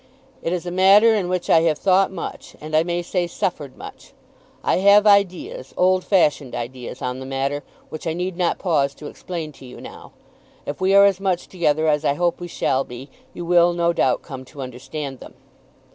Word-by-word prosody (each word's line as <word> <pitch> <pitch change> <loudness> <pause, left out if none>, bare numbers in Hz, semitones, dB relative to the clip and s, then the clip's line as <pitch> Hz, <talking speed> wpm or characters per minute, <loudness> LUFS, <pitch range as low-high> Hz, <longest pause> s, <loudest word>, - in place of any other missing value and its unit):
It 165 - -2
is 180 -1 -2
a 175 - -4
matter 195 +5 +6
in 195 -5 -1
which 180 -1 -2
I 165 - +5
have 160 -2 +1
thought 190 +2 +3
much, 190 - -7
and, 155 +1 -5
I 155 - +5
may 175 +1 -2
say, 175 0 -1
suffered 150 -5 -4
much. - - -12 0.5
I - - +2
have 200 +2 +5
ideas, 200 -9 +1
old 185 0 +3
fashioned 150 -8 +1
ideas, 125 +1 -6
on 125 0 -3
the 130 - -7
matter, 135 +2 -2 0.3
which 155 - -7
I 160 - 0
need 180 +2 -3
not 175 -1 0
pause 140 -6 0
to 150 - -12
explain 165 0 -6
to 135 - -15
you 125 - -11
now. - - -12 0.5
If 145 +5 -6
we 190 +1 +3
are 200 0 +8
as 195 -2 +2
much 190 -3 -1
together 160 -3 0
as 150 0 +2
I 140 -2 +1
hope 175 +1 0
we 175 - -6
shall 135 -5 0
be, 130 +3 -11 0.2
you 175 - -6
will, 175 0 +4
no 170 0 +1
doubt, - - +1
come 135 -4 -8
to 140 +2 -11
understand 135 +2 -7
them. - - -13
170 Hz, 205 wpm, -21 LUFS, 145-185 Hz, 0.5 s, are